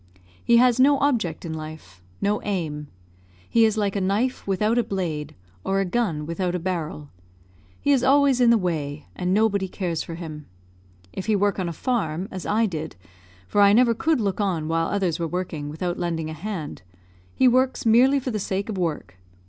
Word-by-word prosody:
He 235 - +5
has 250 0 +4
no 280 +2 +5
object 230 - 0
in 160 - -4
life 155 - -9 0.2
no 205 +1 +1
aim. 155 -7 -3 0.6
He 230 -1 +4
is 220 0 +1
like 205 -2 0
a 200 - 0
knife 205 +8 -1
without 210 +5 +1
a - - +2
blade, 170 -8 -4 0.3
or 195 0 0
a 195 - +1
gun 180 -7 -1
without 175 +2 -2
a - - -1
barrel. 165 -5 -4 0.7
He 285 - +1
is 265 -3 +3
always 275 -1 +4
in 240 - +6
the 235 - +6
way, 155 -6 -3
and 180 0 -2
nobody 200 -1 +2
cares 175 -4 -3
for 165 - -6
him. 155 -3 -8 0.7
If 190 - -6
he 215 - +3
work 205 0 +1
on 180 -2 -1
a - - -3
farm, 180 -3 -2
as 185 -2 -6
I 220 +2 +2
did, 160 -5 -4 0.5
for 205 - +2
I 200 0 +7
never 235 +1 +5
could 315 +5 +1
look 200 -2 -1
on 175 -6 -1
while 165 0 0
others 185 -5 -1
were 165 - -1
working 165 -4 -4
without 175 +4 -3
lending 160 -2 -2
a - - -5
hand, 165 -2 -6 0.5
he 260 - +4
works 255 +1 +2
merely 255 +5 +5
for 255 -1 -4
the 215 - -2
sake 195 +2 -3
of 200 -3 -3
work. 150 - -3
190 Hz, 195 wpm, -24 LUFS, 165-225 Hz, 0.7 s, I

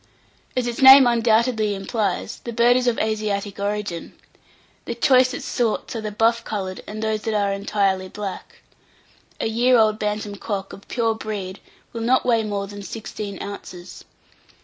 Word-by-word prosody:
As 250 - +1
its 240 +1 -3
name 265 0 +10
undoubtedly 230 -2 +2
implies, 195 0 -2
the 235 - -5
bird 235 +1 +4
is 250 0 +1
of 240 - +2
Asiatic 210 -2 -2
origin. 205 -4 -3 0.7
The 235 - -4
choicest 255 0 +3
sorts 235 0 -1
are 225 - -3
the 215 -1 -4
buff 230 +2 +2
coloured, 190 -4 -4
and 215 +1 -6
those 220 -1 -1
that 220 0 -2
are 200 -1 +1
entirely 195 -1 0
black. 205 -2 -7 0.8
A - - -1
year 240 +3 +3
old 215 -1 +3
Bantam 210 -1 -3
cock 195 -2 -4
of 195 - -13
pure 230 -2 0
breed 205 -3 -6 0.3
will 230 - -4
not 250 +3 +2
weigh 230 -3 +3
more 205 -2 -3
than 205 +1 -9
sixteen 210 -2 -7
ounces. 185 -3 -9
215 Hz, 160 wpm, -22 LUFS, 200-235 Hz, 0.8 s, name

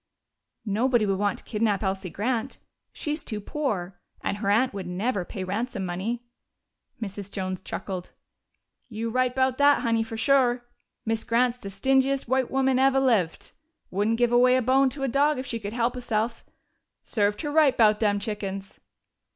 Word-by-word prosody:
"Nobody 230 +2 +2
would 195 -1 0
want 205 -1 0
to - - -12
kidnap 215 -2 0
Elsie 190 -1 -2
Grant. 235 +7 -2 0.3
She's 300 +1 -3
too 215 -3 -4
poor 200 -7 -3 0.2
and 200 - -2
her 200 -1 -2
aunt 230 +5 +3
would 195 -3 -5
never 195 +3 -1
pay 185 +2 -6
ransom 200 +1 -3
money." 200 +7 -3 0.8
Mrs. 200 -2 -6
Jones 185 -2 -3
chuckled. 185 -2 -6 0.8
"You 225 0 -3
right 255 +1 +1
'bout 260 0 +1
dat, 285 0 +5
Honey, 230 -2 +1
fo' 225 0 -5
sure. 245 -1 +2 0.4
Miz 225 0 -1
Grant's 245 +1 +1
de 200 - -7
stingiest 265 +5 +1
white 260 0 +1
woman 265 -1 +2
eve' 270 0 +4
lived. 230 -11 +1 0.4
Wouldn't 210 +4 +1
give 240 0 +2
away 250 +1 +5
a 255 - +3
bone 265 +2 +4
to 270 +1 -6
a - - +1
dog 285 +3 +2
if 255 - -4
she 230 -2 -3
could 205 -1 -6
help 235 0 +1
he'self. 230 -2 -2 0.6
Served 205 -1 0
her 295 - -2
right 300 -3 +4
'bout 215 -2 +5
dem 205 -2 +2
chickens!" 195 -2 -5
230 Hz, 170 wpm, -26 LUFS, 200-255 Hz, 0.8 s, dat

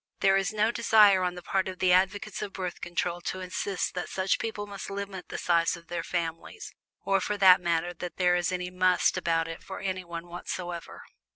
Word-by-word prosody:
There 195 0 +5
is 195 -1 +1
no 215 +1 +2
desire 210 -5 +5
on 180 -1 -1
the 180 - -9
part 190 +1 0
of 185 -1 -5
the 180 -1 +3
advocates 195 +3 +1
of 195 - -5
Birth 180 -2 -5
Control 175 0 -2
to 185 - -4
insist 185 +1 -3
that 180 - -4
such 190 0 0
people 220 -2 -4
must 200 -1 -7
limit 195 -2 -6
the - - -5
size 170 0 +2
of 170 0 -17
their 175 -1 -2
families 165 - -4 0.3
or 195 -1 +2
for 210 - -2
that 185 -2 +7
matter 170 0 0
that 175 0 -7
there 180 -1 +3
is 175 0 0
any 180 0 -3
"must" 185 0 +3
about 165 -1 0
it 165 0 -7
for 190 - -8
anyone 180 -3 -4
whatsoever. 175 0 -6
185 Hz, 205 wpm, -28 LUFS, 175-195 Hz, 0.3 s, that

